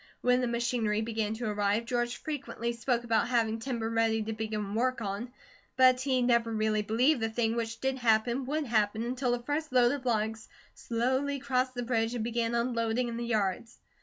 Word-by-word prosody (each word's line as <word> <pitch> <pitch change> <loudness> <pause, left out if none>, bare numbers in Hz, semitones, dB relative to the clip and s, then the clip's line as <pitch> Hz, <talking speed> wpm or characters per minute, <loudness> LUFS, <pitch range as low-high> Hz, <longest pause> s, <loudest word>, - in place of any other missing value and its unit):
When 250 0 +3
the 250 - 0
machinery 235 -3 0
began 220 -1 -2
to 240 +2 -5
arrive, 210 +1 0
George 240 0 -1
frequently 235 -6 -4
spoke 235 0 -1
about 230 -1 +1
having 230 -2 +1
timber 235 -2 -3
ready 225 -1 +1
to 220 +1 -3
begin 215 -2 -3
work 255 +3 +1
on, 210 +3 -4 0.5
but 255 -1 +6
he 260 -2 +1
never 235 -2 +2
really 215 -1 +1
believed 245 +7 +2
the 225 - 0
thing 225 0 0
which 225 -1 -3
did 265 0 -1
happen, 235 +2 +2
would 305 +2 -1
happen, 220 -2 +1
until 250 +1 -1
the 245 0 -1
first 295 +3 -2
load 245 -1 +5
of 275 -3 -4
logs 220 -1 -1 0.2
slowly 260 +4 -1
crossed 255 -1 -1
the 245 - -2
bridge 230 -1 0
and 230 - -2
began 235 0 -1
unloading 235 0 0
in 230 - -4
the 235 0 -3
yards. 215 0 -1
235 Hz, 190 wpm, -30 LUFS, 225-250 Hz, 0.5 s, but